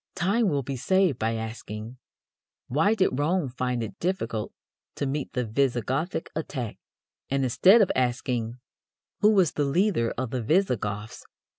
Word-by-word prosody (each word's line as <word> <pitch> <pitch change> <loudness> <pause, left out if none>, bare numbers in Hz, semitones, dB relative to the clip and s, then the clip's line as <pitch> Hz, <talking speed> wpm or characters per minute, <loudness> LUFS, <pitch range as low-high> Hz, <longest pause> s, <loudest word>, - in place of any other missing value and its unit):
time 205 +4 +2
will 140 -4 0
be 135 +2 -4
saved 185 +1 +2
by 115 +1 0
asking: 110 +1 -6 0.7
"Why 160 - +2
did 185 -10 +1
Rome 160 0 +1
find 125 -1 -2
it 105 -3 -8
difficult 115 - -2 0.4
to - - -2
meet 140 +1 -3
the 125 -2 -1
Visigothic 135 - -1
attack," 130 -8 -4 0.5
and, 135 0 +1
instead 190 - +6
of 190 - 0
asking 120 -2 -1 0.6
"Who 210 - +5
was 190 -6 +4
the 145 - -1
leader 155 - +1
of 125 -1 -3
the 130 - -2
Visigoths?" 110 - -1
130 Hz, 145 wpm, -26 LUFS, 115-175 Hz, 0.7 s, instead